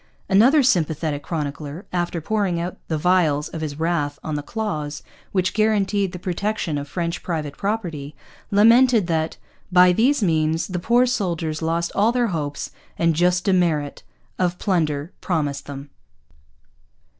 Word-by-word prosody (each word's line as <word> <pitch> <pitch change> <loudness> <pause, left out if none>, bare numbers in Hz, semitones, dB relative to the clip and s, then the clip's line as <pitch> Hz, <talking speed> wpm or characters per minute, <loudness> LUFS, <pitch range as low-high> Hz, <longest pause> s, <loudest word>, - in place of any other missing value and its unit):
Another 255 +10 +5
sympathetic 160 - +1
chronicler, 150 +2 -5
after 175 -1 -1
pouring 195 -1 0
out 175 +2 -4
the 160 - -1
vials 155 -3 +2
of 160 - -6
his 150 -1 -4
wrath 155 -4 0
on 155 - -4
the 145 - -1
clause 155 -7 -4 0.3
which 185 -1 0
guaranteed 205 -3 +1
the 180 - -6
protection 180 -3 -2
of 145 - -6
French 170 +3 -3
private 155 -5 -3
property, 170 -9 -3 0.3
lamented 230 +1 +5
that 160 -2 -1 0.3
'by 180 0 +7
these 245 +5 +2
means 160 -2 +1
the 185 -2 -4
poor 240 +7 +3
souldiers 170 -10 -2
lost 165 +1 -1
all 210 +3 +3
their 240 -2 +1
hopes 145 -3 -3 0.3
and 165 -1 +2
just 180 +2 +2
demerit 170 -7 +1 0.4
of 180 -1 +1
plunder 160 -5 -1
promised 150 -6 -2
them.' 140 0 -8
170 Hz, 145 wpm, -22 LUFS, 155-200 Hz, 0.4 s, by